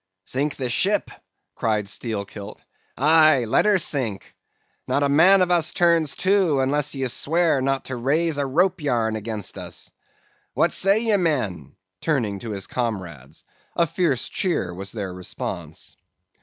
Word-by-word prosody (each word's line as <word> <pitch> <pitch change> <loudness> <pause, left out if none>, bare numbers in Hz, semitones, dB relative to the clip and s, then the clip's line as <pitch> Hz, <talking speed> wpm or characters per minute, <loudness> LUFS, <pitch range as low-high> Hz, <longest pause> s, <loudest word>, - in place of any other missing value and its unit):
"'Sink 140 +3 -2
the 130 - -3
ship?' 195 +11 0 0.4
cried 105 -2 -1
Steelkilt. 100 -1 -5 0.3
'Aye, 155 -2 +5
let 110 - +2
her 210 -2 +4
sink. 130 - -2 0.5
Not 145 - +1
a 140 - +2
man 185 +7 +6
of 180 - -1
us 170 -3 +2
turns 170 -4 +2
to, 185 -7 +2
unless 145 +2 0
you 135 -1 -1
swear 160 +3 +1
not 135 0 -1
to 130 - -5
raise 145 +5 0
a 140 - 0
rope 180 +6 +1
yarn 115 -6 0
against 110 -2 -4
us. - - -5 0.6
What - - +2
say 195 +3 +3
ye, 220 -3 +3
men?' 125 - -2 0.3
turning 115 -10 -1
to 115 - -7
his 100 -3 -3
comrades. 90 - -5 0.3
A 170 - +3
fierce 155 -6 -1
cheer 175 - -1
was 95 +2 -6
their 100 -5 -5
response. 90 0 -6
135 Hz, 150 wpm, -23 LUFS, 110-165 Hz, 0.6 s, man